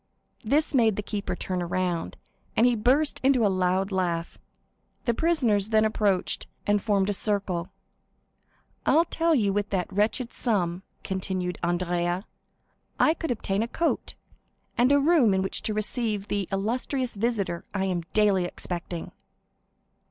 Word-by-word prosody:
This 290 +8 +1
made 225 -6 +4
the 210 - -3
keeper 205 -1 -3
turn 185 -1 -3
around, 175 -1 -2 0.4
and 230 - +5
he 245 -1 +4
burst 265 +7 +2
into 260 -4 +4
a 200 - +2
loud 185 +2 +1
laugh. 175 -3 -2 0.7
The 235 - +2
prisoners 235 - +2
then 220 -1 +4
approached 205 -4 0 0.2
and 205 0 +2
formed 200 -1 +1
a - - -1
circle. 195 -4 -1 1.2
"I 325 - +4
tell 330 0 +2
you 205 -7 +2
that - - -2
with 205 0 -1
that 185 -1 -2
wretched 220 +5 0
sum," 185 -7 -1 0.2
continued 185 -1 -3
Andrea, 175 +1 0 0.7
"I 310 - +5
could 325 -1 -5
obtain 205 -3 -1
a 230 - 0
coat, 335 +7 -1 0.6
and 250 +3 +3
a 285 - +5
room 280 - +4
in 190 - +1
which 190 - -1
to 215 - -1
receive 215 -1 -1
the 200 -3 -1
illustrious 245 +6 -1
visitor 200 -5 -1
I 195 -2 -1
am 180 -2 -1
daily 205 -4 +3
expecting." 175 -1 -5
205 Hz, 150 wpm, -26 LUFS, 185-235 Hz, 1.2 s, and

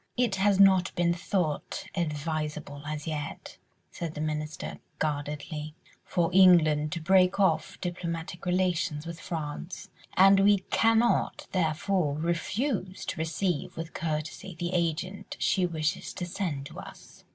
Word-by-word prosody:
"It 235 -6 +2
has 195 0 +3
not 190 -2 +6
been 175 -1 +2
thought 170 -3 -2
advisable 150 -3 -3
as 150 -1 -4
yet," 150 -2 -5 0.3
said 165 -2 -5
the - - -5
Minister, 155 0 -3 0.2
guardedly, 150 +1 -3 0.3
"for 170 -1 0
England 160 -5 +6
to 170 - -2
break 185 +3 +4
off 160 -5 +1
diplomatic 175 -1 -4
relations 180 -4 0
with 170 0 -6
France, 160 +1 -5 0.3
and 195 +1 +7
we 200 +1 +6
cannot 225 +1 +3
therefore 165 -2 0
refuse 185 - -2
to - - -4
receive 165 0 -1
with 165 0 -5
courtesy 160 +3 -4
the 175 +2 -3
agent 180 +3 -2
she 185 -2 +2
wishes 160 -2 -2
to 180 - -4
send 170 -6 -3
to - - -9
us." - - -12
170 Hz, 130 wpm, -28 LUFS, 155-185 Hz, 0.3 s, and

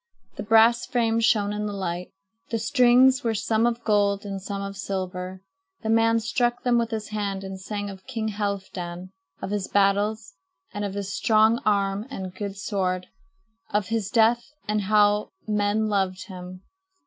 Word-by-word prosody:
The - - -5
brass 225 +2 +4
frame 230 -3 +1
shone 210 -2 +2
in 210 0 -2
the 205 - -4
light. 180 -2 -3 0.4
The 230 - 0
strings 250 +2 +4
were 225 -2 0
some 220 +2 +1
of 240 0 -2
gold 205 -2 +2
and 195 -1 -5
some 200 +1 -4
of 200 0 -6
silver. 185 -1 -4 0.4
The 220 - 0
man 225 0 +4
struck 240 +2 0
them 245 -1 +3
with 230 -1 -1
his 220 -2 -4
hand 200 -2 -3
and 190 0 -7
sang 205 +1 -4
of 190 -1 -10
King 225 -4 -2
Halfdan, 190 -3 -4 0.3
of - - -3
his 205 -2 -1
battles, 205 +1 +1 0.4
of 205 -1 -3
his 200 -1 -4
strong 220 +1 +3
arm 200 +1 +1
and 190 -8 -6
good 200 0 -5
sword, 185 -2 -2 0.6
of 205 -2 -1
his 225 -4 -1
death, 230 +2 +3 0.2
and 210 0 +1
of 200 - -3
how 210 0 +3 0.2
men 210 +1 +1
loved 195 -1 0
him. 185 -1 -9
205 Hz, 170 wpm, -25 LUFS, 195-225 Hz, 0.6 s, brass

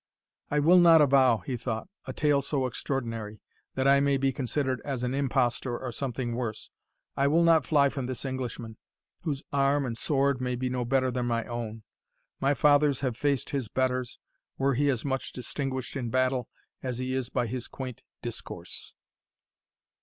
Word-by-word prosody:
"I 150 - 0
will 165 +5 +6
not 165 -2 +8
avow," 130 -5 +4
he 130 - -2
thought, 115 -2 -4 0.2
"a 130 - -4
tale 145 +1 +2
so 140 -1 -1
extraordinary, 115 -4 -3 0.4
that 130 0 +1
I 140 0 +6
may 140 0 +3
be 135 0 +1
considered 130 +1 -1
as 135 -4 -3
an 125 +1 -1
impostor 130 -2 0
or 130 -2 -5
something 120 -1 -3
worse 115 -3 -4 0.4
I 140 - +2
will 165 +4 +4
not 165 -4 +4
fly 145 -3 +5
from 135 -2 -4
this 130 +1 -5
Englishman, 120 -4 -4 0.4
whose 145 -5 -3
arm 140 0 +2
and 115 -2 -3
sword 135 +1 +1
may 125 -1 -1
be 125 +1 -2
no 125 -1 -1
better 130 +1 +2
than 125 0 -1
my 115 -1 0
own. 115 -2 -5 0.6
My 140 +1 +2
fathers 145 -1 +4
have 130 -4 -1
faced 140 +1 0
his 135 -5 -2
betters, 130 0 -1 0.4
were 135 +1 +2
he 145 +3 +2
as 130 -2 -1
much 135 -1 -2
distinguished 130 +1 -4
in 125 -4 -2
battle 130 0 +1 0.3
as 125 -2 -3
he 130 +1 -2
is 130 -2 -2
by 125 - 0
his 120 +1 -4
quaint 130 -3 -7 0.2
discourse." - - -5
130 Hz, 175 wpm, -28 LUFS, 125-140 Hz, 0.6 s, not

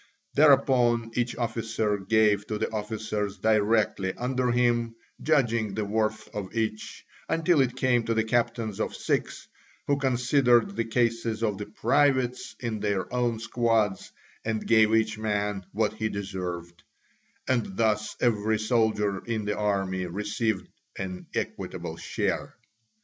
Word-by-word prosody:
Thereupon 125 -5 +4
each 120 0 -1
officer 115 -3 -1
gave 105 0 +2
to 105 - -2
the - - -2
officers 105 -1 -3
directly 105 -3 +2
under 125 0 -1
him, 120 -1 +1 0.3
judging 115 -9 +1
the 110 - -1
worth 110 +1 -1
of 100 0 -6
each, 110 -1 -3 0.2
until 165 -1 +3
it 125 -1 0
came 125 -2 +2
to 115 - 0
the 110 - +2
captains 115 -2 -1
of - - -2
six, - - -2 0.4
who 140 - +2
considered 130 +5 +3
the 115 - -1
cases 115 -1 0
of 105 -3 0
the 105 - -5
privates 130 +2 +1
in 115 -4 -3
their 100 -1 -2
own 120 -2 +1
squads, 115 -3 0 0.3
and 110 -1 -2
gave 110 -1 +5
each 110 -1 +1
man 105 -3 -1
what 110 0 0
he 110 0 -2
deserved: 90 -4 -5 0.7
and 115 -7 0
thus 110 -2 +1
every 110 -2 +2
soldier 110 -3 +1
in 110 -2 -2
the 105 0 -1
army 95 -3 -1
received 105 +2 -2 0.3
an 90 -1 -5
equitable - - -4
share. - - -2
110 Hz, 135 wpm, -27 LUFS, 105-120 Hz, 0.7 s, gave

